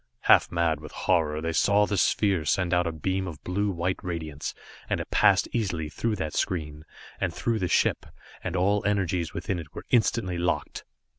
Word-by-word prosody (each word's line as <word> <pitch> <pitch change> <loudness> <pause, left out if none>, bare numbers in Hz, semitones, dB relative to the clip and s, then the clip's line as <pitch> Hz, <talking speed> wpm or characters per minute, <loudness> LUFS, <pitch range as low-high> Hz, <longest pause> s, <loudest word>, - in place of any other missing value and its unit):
Half - - +5
mad 85 -3 +1
with 75 -1 -10
horror, 80 -4 +1
they 80 0 -2
saw 100 +5 +4
the 105 - -2
sphere 95 -2 +2
send 90 +3 +1
out 90 0 +2
a - - -1
beam 95 +4 -2
of 80 -4 -8
blue 100 +3 0
white 90 0 -1
radiance, 80 -5 -4 0.3
and - - 0
it - - -6
passed - - +4
easily 90 -9 -1
through 110 +7 -1
that 80 -5 -4
screen, 75 -4 -2 0.3
and - - 0
through 115 -2 -1
the 90 - 0
ship, - - +1 0.4
and 90 -1 -3
all 100 +3 +2
energies 95 -5 0
within 90 +1 -2
it 75 -3 -11
were - - -7
instantly 110 -6 +2
locked. 85 0 -2
90 Hz, 190 wpm, -27 LUFS, 80-100 Hz, 0.4 s, Half